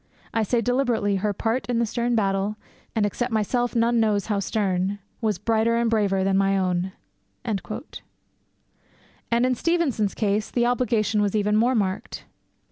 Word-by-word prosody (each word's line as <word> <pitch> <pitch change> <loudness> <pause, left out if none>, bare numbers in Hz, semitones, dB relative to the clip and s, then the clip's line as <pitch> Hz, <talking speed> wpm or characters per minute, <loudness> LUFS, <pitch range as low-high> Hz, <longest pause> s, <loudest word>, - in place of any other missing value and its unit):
I 225 - +1
say 230 +3 +1
deliberately 235 -5 +1
her 210 +2 0
part 225 +5 -1
in 245 - +1
the 235 - +2
stern 235 +2 -1
battle 195 -1 0 0.4
(and 215 -2 +2
except 240 +4 -2
myself 240 +3 0
none 235 0 +3
knows 210 -3 +2
how 205 -3 0
stern) 195 -1 -1 0.2
was 215 -4 0
brighter 225 +2 +1
and 235 -1 +1
braver 200 -4 +2
than 195 0 +2
my 195 0 +2
own.' 185 0 0 0.5
And 210 -3 -1 1.7
in 245 +2 +3
Stevenson's 270 - 0
case 210 0 0
the 240 -1 +1
obligation 235 -4 +1
is 205 0 0
even 210 0 +2
more 240 +4 +3
marked. 205 +1 -2
220 Hz, 155 wpm, -24 LUFS, 200-235 Hz, 1.7 s, none